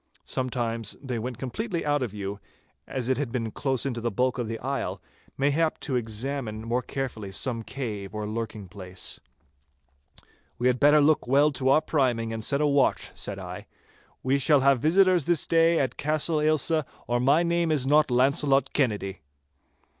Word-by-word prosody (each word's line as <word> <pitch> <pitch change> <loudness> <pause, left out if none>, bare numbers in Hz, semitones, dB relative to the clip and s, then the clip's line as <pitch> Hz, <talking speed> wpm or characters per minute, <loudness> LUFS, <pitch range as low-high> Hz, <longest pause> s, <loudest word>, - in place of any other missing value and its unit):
Sometimes 115 -4 -2
they 130 -4 -4
went 125 +1 -5
completely 170 - -3
out 145 -1 +1
of 125 - -1
view, 100 0 -5 0.5
as 130 -3 -3
it 130 0 +1
had 140 -5 -2
been 115 -3 -2
close 130 0 -1
into 120 -4 -2
the 120 - 0
bulk 125 +2 0
of 120 - -2
the 115 0 -4
isle, 135 +4 -3 0.4
mayhap 145 +4 +1
to 135 - -2
examine 115 -1 -3
more 120 +2 +1
carefully 120 -7 -5
some 115 +4 -1
cave 110 -6 -6
or 105 0 -3
lurking 110 -2 -5
place. 90 0 -7 1.4
'We 120 - -3
had 125 0 +3
better 150 +1 +6
look 150 -2 +3
well 140 +4 +4
to 130 -1 0
our 140 +3 +5
priming, 120 -8 0
and 110 -1 -4
set 140 +5 +1
a - - +3
watch,' 140 -2 +2
said - - -5
I. - - -8 0.6
'We 135 +2 +2
shall 140 +1 +4
have 135 -1 +4
visitors 180 +2 +4
this 175 -3 +2
day 165 0 +3
at 130 -2 -1
Castle 155 +1 +1
Ailsa, 155 +1 +2 0.2
or 120 0 0
my 140 +7 +4
name 170 -1 +1
is 145 -4 +1
not 150 +2 +4
Launcelot 135 +2 +2
Kennedy. 105 -8 -1
130 Hz, 175 wpm, -26 LUFS, 115-145 Hz, 1.4 s, better